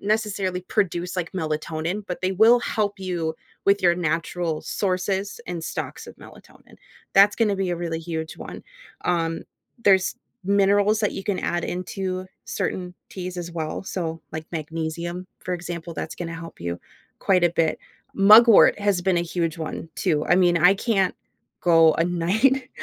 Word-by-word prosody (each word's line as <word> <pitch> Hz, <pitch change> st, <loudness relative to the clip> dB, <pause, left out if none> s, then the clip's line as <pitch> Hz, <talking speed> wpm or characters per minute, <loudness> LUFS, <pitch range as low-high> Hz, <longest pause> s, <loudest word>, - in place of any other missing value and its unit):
necessarily 200 Hz, -3 st, -1 dB
produce 180 Hz, -2 st, -1 dB
like 175 Hz, -3 st, -3 dB
melatonin, 160 Hz, +3 st, -3 dB
but 180 Hz, -, -5 dB
they 185 Hz, +1 st, +1 dB
will 225 Hz, +5 st, +6 dB
help 210 Hz, -4 st, -1 dB
you 175 Hz, -4 st, -2 dB, 0.3 s
with 200 Hz, 0 st, +4 dB
your 175 Hz, -1 st, +5 dB
natural 165 Hz, -1 st, -2 dB
sources 195 Hz, +1 st, -2 dB
and 170 Hz, -2 st, -5 dB
stocks -, -, -5 dB
of -, -, -12 dB
melatonin. -, -, -16 dB, 0.4 s
That's 200 Hz, +1 st, +6 dB
gonna 215 Hz, -3 st, +2 dB
be 190 Hz, -2 st, -1 dB
a 175 Hz, -, -1 dB
really 165 Hz, -1 st, -3 dB
huge 160 Hz, -1 st, -5 dB
one, -, -, -9 dB, 0.4 s
um 165 Hz, -2 st, 0 dB, 0.4 s
There's 190 Hz, -2 st, +4 dB, 0.3 s
minerals 200 Hz, +2 st, +3 dB
that 210 Hz, -, 0 dB
you 195 Hz, -, -5 dB
can 195 Hz, -1 st, -2 dB
add 175 Hz, -, -1 dB
into 185 Hz, +1 st, -4 dB, 0.2 s
certain 180 Hz, -1 st, -3 dB, 0.2 s
teas 180 Hz, -1 st, -6 dB
as 170 Hz, -1 st, -5 dB
well, 160 Hz, -2 st, -4 dB
so, 165 Hz, -4 st, -4 dB
like 155 Hz, 0 st, -6 dB
magnesium, 165 Hz, +2 st, -4 dB
for 180 Hz, -, -4 dB
example, 170 Hz, -1 st, -6 dB
that's 160 Hz, -, -5 dB
gonna 165 Hz, -1 st, -5 dB
help 165 Hz, 0 st, -10 dB
you 85 Hz, 0 st, -4 dB, 0.4 s
quite 185 Hz, -2 st, +3 dB
a 175 Hz, -, +4 dB
bit. 165 Hz, -2 st, 0 dB, 0.4 s
Mugwort 215 Hz, +3 st, +7 dB
has 200 Hz, -3 st, +1 dB
been 185 Hz, 0 st, +1 dB
a 170 Hz, -, +2 dB
huge 170 Hz, -1 st, -2 dB
one 160 Hz, +1 st, -5 dB
too. 155 Hz, -5 st, 0 dB
I -, -, +4 dB
mean, 175 Hz, -2 st, +4 dB
I 180 Hz, +3 st, +6 dB
can't 195 Hz, -3 st, +1 dB, 0.5 s
go 165 Hz, -2 st, +6 dB
a 165 Hz, -, +1 dB
night 220 Hz, +10 st, +1 dB
180 Hz, 165 wpm, -24 LUFS, 165-195 Hz, 0.5 s, Mugwort